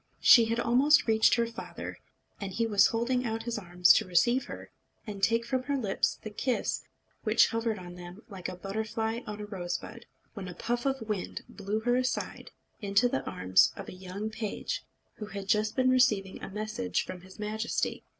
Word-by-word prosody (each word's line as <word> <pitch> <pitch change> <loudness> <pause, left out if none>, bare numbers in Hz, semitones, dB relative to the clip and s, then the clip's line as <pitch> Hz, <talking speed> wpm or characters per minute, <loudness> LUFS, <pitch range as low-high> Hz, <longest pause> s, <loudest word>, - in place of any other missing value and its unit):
She 235 -2 +8
had 230 +1 -1
almost 270 +6 +4
reached 220 -1 +4
her 235 - +2
father, 230 0 -7 0.4
and 200 -2 -4
he 230 +5 0
was 210 -3 +5
holding 245 +2 0
out 225 -1 -2
his 230 -1 -3
arms 180 -2 +5
to - - +1
receive 240 +9 +3
her, - - -9 0.3
and 205 -3 -7
take 230 +3 +2
from 255 +2 0
her 285 -1 0
lips 210 -7 0
the 215 - -6
kiss 250 +4 -1 0.4
which - - +4
hovered 230 -1 -1
on 175 -1 -9
them 180 +4 -10
like 190 -4 -6
a - - -6
butterfly 220 +4 -3
on 210 0 -5
a 210 - -5
rosebud, 185 -4 -5 0.3
when 200 -4 -6
a 180 - -7
puff 240 +6 -1
of 265 -5 -2
wind 210 -4 -3
blew 205 +1 -3
her 245 +2 +2
aside 255 +1 -2 0.3
into 200 +4 +3
the 135 - -1
arms 95 +8 +3
of - - -8
a - - -8
young 190 +4 -6
page, 215 -2 -4 0.3
who 210 - -6
had 200 -2 -7
just 215 0 +1
been 255 -1 +3
receiving 215 -7 +2
a - - -6
message 215 +4 -2
from 180 - -7
his 185 +1 -15
Majesty. 220 +2 -2
215 Hz, 190 wpm, -29 LUFS, 195-235 Hz, 0.4 s, She